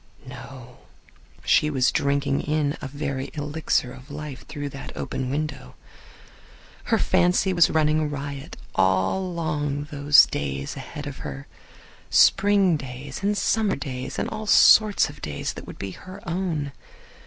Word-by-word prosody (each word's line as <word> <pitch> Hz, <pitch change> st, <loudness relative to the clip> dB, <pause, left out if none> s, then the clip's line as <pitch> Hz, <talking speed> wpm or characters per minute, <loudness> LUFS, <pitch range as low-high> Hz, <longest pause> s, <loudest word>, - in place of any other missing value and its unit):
No; 125 Hz, -1 st, -11 dB, 0.7 s
she 150 Hz, -, +4 dB
was 130 Hz, -4 st, +2 dB
drinking 140 Hz, 0 st, 0 dB
in 150 Hz, -1 st, 0 dB
a 140 Hz, -, -4 dB
very 135 Hz, -1 st, -4 dB
elixir 145 Hz, -4 st, -1 dB
of 130 Hz, +3 st, -14 dB
life 145 Hz, -2 st, -8 dB
through 145 Hz, -2 st, -5 dB
that 135 Hz, 0 st, -8 dB
open 130 Hz, -1 st, -3 dB
window. 140 Hz, -, -4 dB, 1.1 s
Her -, -, +2 dB
fancy 180 Hz, +2 st, +2 dB
was 170 Hz, -2 st, +5 dB
running 155 Hz, -1 st, +2 dB
riot 140 Hz, +1 st, -6 dB, 0.2 s
along 145 Hz, -, 0 dB
those 145 Hz, 0 st, +6 dB
days 70 Hz, -1 st, -4 dB
ahead 145 Hz, +3 st, -8 dB
of 145 Hz, -2 st, -6 dB
her. 70 Hz, 0 st, -7 dB, 0.6 s
Spring 195 Hz, -4 st, +4 dB
days, 135 Hz, +2 st, -8 dB
and 205 Hz, +1 st, 0 dB
summer 220 Hz, -1 st, +1 dB
days, 130 Hz, -2 st, -5 dB
and -, -, -1 dB
all 215 Hz, 0 st, -6 dB
sorts 210 Hz, 0 st, +6 dB
of 145 Hz, -1 st, -12 dB
days 75 Hz, -1 st, -4 dB
that -, -, -10 dB
would -, -, -9 dB
be 100 Hz, -, -5 dB
her 185 Hz, -, -11 dB
own. 165 Hz, -5 st, -2 dB
145 Hz, 140 wpm, -24 LUFS, 135-160 Hz, 1.1 s, those